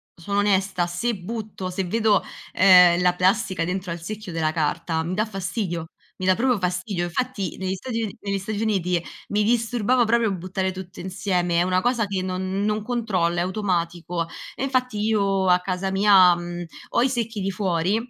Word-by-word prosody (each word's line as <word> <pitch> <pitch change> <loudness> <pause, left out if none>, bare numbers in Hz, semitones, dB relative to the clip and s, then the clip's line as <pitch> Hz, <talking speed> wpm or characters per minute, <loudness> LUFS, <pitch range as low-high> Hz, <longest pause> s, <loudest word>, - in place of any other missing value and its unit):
sono 200 +4 -2
onesta, 195 -3 +1
se 210 +7 -1
butto 205 0 -6
se 185 +1 -2
vedo, 215 +3 +2 0.3
ehm, 180 -2 +7
la 180 0 +4
plastica 185 -1 +1
dentro 180 0 -3
al 170 -1 -5
secchio 210 +1 -6
della 160 -1 0
carta, 160 +1 -1
mi 175 +3 -3
dà 215 +3 +1
fastidio, 185 -4 -3 0.3
mi 185 - -4
dà 185 0 +4
proprio 250 -1 +2
fastidio. 180 0 -2
Infatti 200 +1 -3
negli 190 0 -2
Stati 230 +3 -4
Uni 205 - -5
negli 200 -1 -2
Stati 205 +2 -4
Uniti 180 -6 0 0.3
mi 210 +1 +1
disturbava 240 +1 +2
proprio 225 -1 +2
buttare 185 +1 -2
tutto 185 -1 -9
insieme, 180 -2 -1
è - - +4
una 185 0 +1
cosa 245 -2 +1
che 190 -1 -2
non 185 +1 -2
non 215 0 0
controllo, 205 -8 0
è - - +2
automatico. 175 -3 -2 0.3
E - - -4
infatti 255 -5 0
io 200 -3 +1
a 180 0 +5
casa 185 +1 -3
mia, 190 -3 +6
mhmm, 175 0 -6 0.2
ho 235 - +1
i 260 - +2
secchi 230 -3 -2
di 195 - -1
fuori, 185 0 0
190 Hz, 180 wpm, -23 LUFS, 180-215 Hz, 0.3 s, ehm